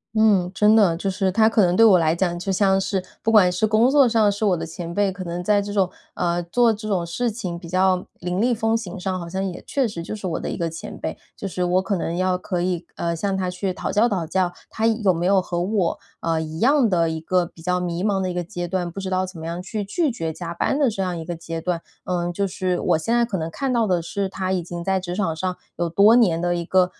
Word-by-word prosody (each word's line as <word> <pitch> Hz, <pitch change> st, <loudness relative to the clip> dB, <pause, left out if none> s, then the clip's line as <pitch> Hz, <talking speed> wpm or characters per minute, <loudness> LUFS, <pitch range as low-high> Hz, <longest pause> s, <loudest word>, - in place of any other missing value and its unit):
嗯， 205 Hz, -5 st, +3 dB
真 210 Hz, +2 st, +5 dB
的， 190 Hz, -7 st, +4 dB
就 195 Hz, -, -4 dB
是 190 Hz, 0 st, 0 dB
他 220 Hz, +3 st, +4 dB
可 225 Hz, -2 st, +3 dB
能 175 Hz, -1 st, +2 dB
对 225 Hz, +3 st, +6 dB
我 190 Hz, -5 st, +7 dB
来 160 Hz, 0 st, +2 dB
讲 175 Hz, -1 st, -1 dB
就 195 Hz, +2 st, -2 dB
像 190 Hz, 0 st, +3 dB
是 190 Hz, -1 st, -1 dB, 0.2 s
不 225 Hz, -, +1 dB
管 200 Hz, -5 st, +6 dB
是 180 Hz, +5 st, +1 dB
工 225 Hz, +4 st, +4 dB
作 275 Hz, -4 st, +5 dB
上 220 Hz, -2 st, +3 dB
是 205 Hz, +2 st, -4 dB
我 190 Hz, -5 st, +3 dB
的 165 Hz, -, -4 dB
前 165 Hz, +1 st, -7 dB
辈， 200 Hz, +2 st, +1 dB
可 185 Hz, 0 st, -7 dB
能 175 Hz, +1 st, -4 dB
在 205 Hz, +2 st, +3 dB
这 205 Hz, 0 st, -5 dB
种 195 Hz, -3 st, +2 dB, 0.3 s
呃， 175 Hz, 0 st, 0 dB
做 230 Hz, +7 st, +2 dB
这 215 Hz, +1 st, -7 dB
种 185 Hz, -4 st, 0 dB
事 235 Hz, +9 st, -1 dB
情 185 Hz, -6 st, -5 dB
比 170 Hz, -, -10 dB
较 185 Hz, 0 st, +2 dB, 0.2 s
凌 180 Hz, +2 st, -2 dB
厉 245 Hz, +2 st, +3 dB
风 225 Hz, 0 st, +1 dB
行 195 Hz, -5 st, -4 dB
上， 185 Hz, 0 st, -2 dB
好 170 Hz, -1 st, -7 dB
像 190 Hz, +2 st, -2 dB
也 180 Hz, -, -7 dB
确 270 Hz, -4 st, +1 dB
实 190 Hz, -5 st, -6 dB
就 170 Hz, -, -5 dB
是 205 Hz, -, -8 dB
我 170 Hz, -3 st, -2 dB
的 -, -, -4 dB
一 -, -, -4 dB
个 170 Hz, -, -1 dB
前 165 Hz, 0 st, -7 dB
辈。 -, -, -4 dB, 0.2 s
就 200 Hz, -, -4 dB
是 180 Hz, -1 st, -2 dB
我 180 Hz, +1 st, +2 dB
可 200 Hz, 0 st, -1 dB
能 170 Hz, -1 st, -2 dB
要 185 Hz, 0 st, +1 dB
可 180 Hz, -1 st, -3 dB
以， 175 Hz, -2 st, -2 dB
呃， 170 Hz, 0 st, -2 dB
向 195 Hz, +3 st, -1 dB
他 185 Hz, -1 st, -1 dB
去 185 Hz, +1 st, -2 dB
讨 -, -, -4 dB
教 225 Hz, +3 st, +3 dB
讨 185 Hz, -5 st, -1 dB
教， 180 Hz, +2 st, 0 dB, 0.2 s
他 225 Hz, +1 st, 0 dB
有 215 Hz, -4 st, +2 dB
没 170 Hz, +1 st, -1 dB
有 195 Hz, 0 st, +5 dB
和 175 Hz, -1 st, -2 dB
我， 190 Hz, -2 st, 0 dB, 0.2 s
呃， 165 Hz, -1 st, 0 dB
一 160 Hz, 0 st, -6 dB
样 265 Hz, -, +4 dB
的 170 Hz, -3 st, +2 dB
一 160 Hz, 0 st, -4 dB
个 180 Hz, +1 st, +1 dB
比 170 Hz, -1 st, -15 dB
较 180 Hz, +1 st, 0 dB
迷 175 Hz, 0 st, -3 dB
茫 200 Hz, -2 st, +1 dB
的 185 Hz, -1 st, -1 dB
一 -, -, -5 dB
个 175 Hz, -, -2 dB
阶 175 Hz, 0 st, -5 dB
段， 175 Hz, -1 st, -2 dB
不 195 Hz, -, -7 dB
知 190 Hz, -1 st, -4 dB
道 185 Hz, 0 st, 0 dB
怎 180 Hz, -3 st, -10 dB
么 160 Hz, -, -7 dB
样 170 Hz, +2 st, -4 dB
去 205 Hz, +2 st, -4 dB
拒 300 Hz, -, 0 dB
绝 165 Hz, -8 st, -4 dB
加 170 Hz, +1 st, -6 dB
班 275 Hz, -, 0 dB
的 280 Hz, -4 st, +4 dB
这 200 Hz, -3 st, -2 dB
样 180 Hz, -1 st, -2 dB
一 165 Hz, -, -5 dB
个 170 Hz, +1 st, -5 dB
阶 165 Hz, 0 st, -6 dB
段。 170 Hz, -1 st, -2 dB, 0.2 s
呃， 175 Hz, -1 st, -1 dB
就 200 Hz, +2 st, 0 dB
是 185 Hz, -1 st, -1 dB
我 -, -, +2 dB
现 225 Hz, +9 st, 0 dB
在 240 Hz, -, +4 dB
可 220 Hz, -5 st, -2 dB
能 160 Hz, 0 st, -3 dB
看 270 Hz, +8 st, -2 dB
到 235 Hz, -2 st, +2 dB
的 180 Hz, -3 st, +1 dB
是 195 Hz, +4 st, -2 dB
他 190 Hz, 0 st, -3 dB
已 185 Hz, -2 st, 0 dB
经 170 Hz, 0 st, -6 dB
在 190 Hz, 0 st, +1 dB
职 180 Hz, -1 st, -5 dB
场 185 Hz, -5 st, -1 dB
上 185 Hz, +2 st, -2 dB, 0.2 s
有 170 Hz, 0 st, -1 dB
多 200 Hz, +7 st, +5 dB
年 180 Hz, -9 st, +3 dB
的 175 Hz, 0 st, +1 dB
一 170 Hz, -1 st, -3 dB
个 185 Hz, +1 st, +4 dB
185 Hz, 305 characters per minute, -22 LUFS, 175-205 Hz, 0.3 s, 我